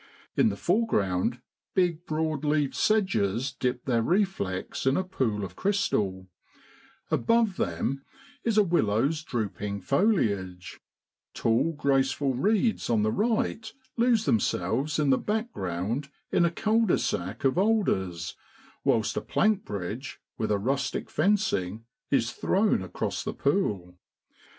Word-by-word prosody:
In -, -, +4 dB
the 100 Hz, -, -3 dB
foreground 105 Hz, -, +1 dB, 0.3 s
big 175 Hz, -2 st, +1 dB
broadleaved 155 Hz, -2 st, 0 dB
sedges 135 Hz, -, +1 dB
dip 125 Hz, -2 st, -2 dB
their 120 Hz, -3 st, +2 dB
reflex 155 Hz, -, -1 dB
in 135 Hz, -, +3 dB
a 185 Hz, -, +1 dB
pool 120 Hz, -, -1 dB
of 90 Hz, -1 st, -10 dB
crystal, 100 Hz, -, 0 dB, 0.8 s
above 230 Hz, -4 st, +2 dB
them 110 Hz, +11 st, -2 dB, 0.4 s
is 225 Hz, -2 st, +1 dB
a 210 Hz, -, +7 dB
willow's 150 Hz, -, +1 dB
drooping 105 Hz, -6 st, -3 dB
foliage, 100 Hz, -, 0 dB, 0.6 s
tall 115 Hz, +9 st, +1 dB
graceful 135 Hz, -1 st, +1 dB
reeds 215 Hz, -, +1 dB
on 110 Hz, -3 st, +2 dB
the 110 Hz, -, +2 dB
right 220 Hz, -, 0 dB, 0.2 s
lose 235 Hz, -2 st, +3 dB
themselves 115 Hz, -, 0 dB
in 145 Hz, -3 st, +2 dB
the 130 Hz, -, +3 dB
background 130 Hz, -, -2 dB, 0.2 s
in 175 Hz, -, +4 dB
a -, -, +3 dB
cul 220 Hz, +5 st, +2 dB
de -, -, +3 dB
sac 95 Hz, +6 st, -3 dB
of 135 Hz, +5 st, +2 dB
alders, 95 Hz, -, 0 dB, 0.5 s
whilst 110 Hz, -1 st, +1 dB
a -, -, 0 dB
plank 210 Hz, -1 st, +1 dB
bridge, 105 Hz, +6 st, -5 dB, 0.2 s
with 110 Hz, -, -2 dB
a 105 Hz, -, +2 dB
rustic 130 Hz, +5 st, -2 dB
fencing, 130 Hz, -, 0 dB, 0.2 s
is 120 Hz, -4 st, +2 dB
thrown 200 Hz, -, +1 dB
across 95 Hz, -1 st, -3 dB
the -, -, -4 dB
pool. 100 Hz, -, -1 dB
135 Hz, 125 wpm, -27 LUFS, -, 0.8 s, a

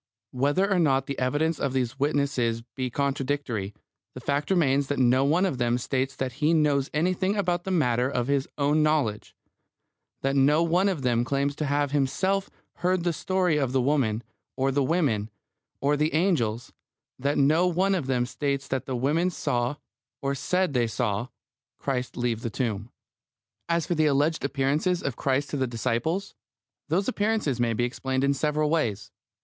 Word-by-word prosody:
Whether 145 Hz, +9 st, +1 dB
or 195 Hz, -3 st, +2 dB
not 135 Hz, -5 st, +2 dB
the 140 Hz, -, -4 dB
evidence 145 Hz, +5 st, 0 dB
of 135 Hz, -, -1 dB
these 130 Hz, 0 st, -1 dB
witnesses 135 Hz, -5 st, 0 dB
be 130 Hz, -1 st, -2 dB
contradictory, 135 Hz, -6 st, -2 dB, 0.4 s
the -, -, -6 dB
facts 145 Hz, +1 st, -1 dB
remain 145 Hz, -7 st, +3 dB
that 140 Hz, 0 st, -3 dB
no 130 Hz, +1 st, +4 dB
one 165 Hz, +7 st, +3 dB
of 140 Hz, -10 st, -2 dB
them 120 Hz, 0 st, +2 dB
states 130 Hz, +2 st, -2 dB
that 130 Hz, -1 st, -2 dB
he 155 Hz, +3 st, +4 dB
knows 145 Hz, -3 st, +2 dB
anything 185 Hz, +5 st, 0 dB
about 175 Hz, -4 st, 0 dB
the -, -, -3 dB
matter 125 Hz, -8 st, +2 dB
of 125 Hz, -3 st, -1 dB
his 140 Hz, 0 st, 0 dB
own 145 Hz, +1 st, +2 dB
knowledge; 145 Hz, -9 st, 0 dB, 0.9 s
that 135 Hz, +1 st, +1 dB
no 145 Hz, +4 st, +4 dB
one 180 Hz, +4 st, +2 dB
of 165 Hz, -8 st, -3 dB
them 120 Hz, -1 st, +2 dB
claims 140 Hz, +2 st, -1 dB
to 155 Hz, -, -1 dB
have 145 Hz, 0 st, 0 dB
himself 190 Hz, +8 st, 0 dB, 0.3 s
heard 180 Hz, 0 st, +1 dB
the 175 Hz, -1 st, +1 dB
story 180 Hz, -2 st, +1 dB
of 135 Hz, -3 st, 0 dB
the 135 Hz, -, +3 dB
woman, 125 Hz, -5 st, +1 dB, 0.3 s
or 135 Hz, 0 st, +1 dB
the 140 Hz, +1 st, +1 dB
women, 130 Hz, -9 st, +1 dB, 0.5 s
or 145 Hz, +2 st, +2 dB
the 155 Hz, +2 st, 0 dB
angels; 125 Hz, -, 0 dB, 0.5 s
that 140 Hz, +2 st, 0 dB
no 155 Hz, +6 st, +4 dB
one 185 Hz, +3 st, +2 dB
of 170 Hz, -8 st, -1 dB
them 125 Hz, -2 st, +1 dB
states 140 Hz, +1 st, -2 dB
that 130 Hz, -1 st, -3 dB
the 130 Hz, -, -2 dB
women 150 Hz, +8 st, +1 dB
saw, 125 Hz, -5 st, -1 dB, 0.4 s
or 140 Hz, -1 st, -1 dB
said 180 Hz, +4 st, 0 dB
they 120 Hz, -2 st, +2 dB
saw, 110 Hz, 0 st, -1 dB, 0.5 s
Christ 125 Hz, -3 st, -3 dB
leave 120 Hz, -2 st, -1 dB
the 115 Hz, -, -3 dB
tomb. 110 Hz, -1 st, -3 dB, 0.8 s
As 170 Hz, -1 st, +1 dB
for -, -, -1 dB
the 155 Hz, -2 st, +2 dB
alleged 145 Hz, +3 st, +1 dB
appearances 145 Hz, +6 st, 0 dB
of 140 Hz, -4 st, -2 dB
Christ 135 Hz, +2 st, -1 dB
to 145 Hz, -, -1 dB
the 130 Hz, -1 st, 0 dB
disciples, 125 Hz, -, -2 dB, 0.6 s
those 185 Hz, +6 st, +1 dB
appearances 210 Hz, -, 0 dB
may 120 Hz, -1 st, +1 dB
be 120 Hz, -, 0 dB
explained 130 Hz, +2 st, -1 dB
in 140 Hz, 0 st, +3 dB
several 150 Hz, +1 st, 0 dB
ways. 115 Hz, -11 st, -1 dB
140 Hz, 175 wpm, -26 LUFS, 125-160 Hz, 0.9 s, no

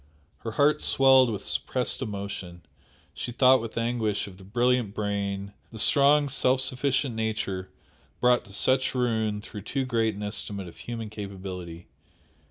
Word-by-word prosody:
Her 115 Hz, -, -6 dB
heart 150 Hz, +4 st, +3 dB
swelled 130 Hz, -2 st, +5 dB
with 105 Hz, -3 st, -4 dB
suppressed 125 Hz, +1 st, 0 dB
emotion, 100 Hz, -6 st, -6 dB, 0.5 s
she 120 Hz, -, -5 dB
thought 130 Hz, +1 st, +5 dB
with 115 Hz, 0 st, -7 dB
anguish 115 Hz, -3 st, 0 dB
of 95 Hz, -1 st, -12 dB
the -, -, -13 dB
brilliant 120 Hz, +1 st, +1 dB
brain, 100 Hz, -1 st, -2 dB, 0.2 s
the 110 Hz, -, -9 dB
strong, 145 Hz, +5 st, +4 dB
self 130 Hz, -1 st, +2 dB
sufficient 130 Hz, 0 st, 0 dB
nature 105 Hz, -4 st, -3 dB, 0.5 s
brought 125 Hz, 0 st, +4 dB
to -, -, -13 dB
such 130 Hz, +6 st, +2 dB
ruin 110 Hz, -4 st, 0 dB
through 105 Hz, 0 st, -9 dB
too 135 Hz, +6 st, -2 dB
great 115 Hz, -4 st, 0 dB
an 105 Hz, -, -6 dB
estimate 100 Hz, -2 st, -4 dB
of 85 Hz, -, -12 dB
human 115 Hz, -3 st, -6 dB
capability. 95 Hz, -5 st, -7 dB
110 Hz, 150 wpm, -27 LUFS, 100-125 Hz, 0.5 s, swelled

